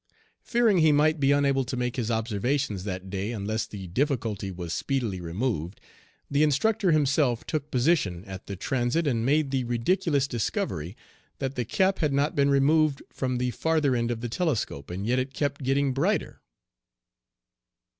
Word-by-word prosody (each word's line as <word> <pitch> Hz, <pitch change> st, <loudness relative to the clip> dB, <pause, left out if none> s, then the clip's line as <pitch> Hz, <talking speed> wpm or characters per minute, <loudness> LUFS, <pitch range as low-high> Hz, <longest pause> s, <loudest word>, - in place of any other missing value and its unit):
Fearing 230 Hz, -6 st, +3 dB
he 160 Hz, -1 st, +5 dB
might 155 Hz, +2 st, +3 dB
be 140 Hz, 0 st, +3 dB
unable 140 Hz, -1 st, +3 dB
to 125 Hz, +1 st, -4 dB
make 125 Hz, 0 st, -1 dB
his 120 Hz, -3 st, -2 dB
observations 110 Hz, -1 st, -1 dB
that 95 Hz, -1 st, -5 dB
day 100 Hz, +3 st, -2 dB
unless 110 Hz, 0 st, -2 dB
the 100 Hz, -3 st, -8 dB
difficulty 110 Hz, -, -1 dB
was 90 Hz, -3 st, -5 dB
speedily 120 Hz, -10 st, -2 dB
removed, 90 Hz, 0 st, -3 dB, 0.5 s
the 140 Hz, +1 st, +1 dB
instructor 185 Hz, +7 st, +2 dB
himself 140 Hz, -5 st, +2 dB
took 150 Hz, -2 st, -3 dB
position 120 Hz, -, +1 dB
at 95 Hz, -2 st, -9 dB
the 100 Hz, -, -4 dB
transit, 125 Hz, -, 0 dB
and 120 Hz, -6 st, 0 dB
made 145 Hz, +2 st, +2 dB
the 135 Hz, -2 st, 0 dB
ridiculous 140 Hz, +5 st, +1 dB
discovery 115 Hz, -, -3 dB, 0.4 s
that 135 Hz, -1 st, -3 dB
the 125 Hz, -3 st, -2 dB
cap 190 Hz, -, +1 dB
had 150 Hz, -4 st, +1 dB
not 140 Hz, +2 st, +1 dB
been 140 Hz, 0 st, +3 dB
removed 140 Hz, +1 st, +3 dB
from 130 Hz, -2 st, -1 dB
the 125 Hz, 0 st, 0 dB
farther 155 Hz, -2 st, +1 dB
end 115 Hz, -1 st, 0 dB
of 115 Hz, -1 st, -3 dB
the 120 Hz, -, -2 dB
telescope, 115 Hz, -, -2 dB
and 95 Hz, +3 st, -4 dB
yet 125 Hz, +3 st, +2 dB
it 130 Hz, +1 st, -4 dB
kept 145 Hz, 0 st, -1 dB
getting 135 Hz, +1 st, +1 dB
brighter. 170 Hz, +7 st, -1 dB
130 Hz, 165 wpm, -27 LUFS, 110-145 Hz, 0.5 s, he